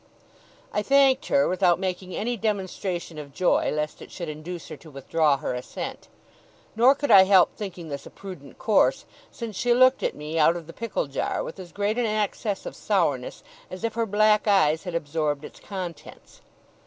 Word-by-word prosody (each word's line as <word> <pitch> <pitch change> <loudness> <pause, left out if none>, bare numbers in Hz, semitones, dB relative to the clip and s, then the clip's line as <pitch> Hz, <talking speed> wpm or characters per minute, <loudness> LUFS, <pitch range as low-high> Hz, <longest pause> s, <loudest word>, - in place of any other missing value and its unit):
I 210 - +1
thanked 270 +2 +4
her, 280 0 +3
without 180 -2 +3
making 185 -1 -4
any 240 +3 -1
demonstration 190 -6 -3
of 140 -2 -10
joy, 185 - +2
lest 150 0 -3
it - - -10
should 170 -3 -6
induce 155 +3 -7
her - - -7
to 160 - -15
withdraw 145 +1 +1
her 135 - -3
assent. 125 0 -6 0.7
Nor 250 +5 +6
could 285 +1 -1
I 190 -1 +9
help 190 -2 +5
thinking 180 -6 -7
this 140 -1 -6
a - - -10
prudent 180 -9 -11
course, 215 -3 +2 0.2
since 230 -4 -7
she 240 +5 +2
looked 255 +1 +5
at - - -1
me 155 +2 -4
out 160 +2 +5
of 170 -2 -6
the 165 - -11
pickle 230 -2 -3
jar, 140 -1 -2
with 165 - -8
as 180 -2 -9
great 205 +3 -1
an 240 - +1
access 210 -1 -2
of - - -6
sourness 150 -11 -1 0.3
as 185 +3 -8
if 230 -1 -1
her 230 0 -1
black 210 +1 +3
eyes 160 -5 +3
had 180 -2 -4
absorbed 150 -2 -1
its - - -12
contents. 185 -5 -8
185 Hz, 190 wpm, -25 LUFS, 160-215 Hz, 0.7 s, I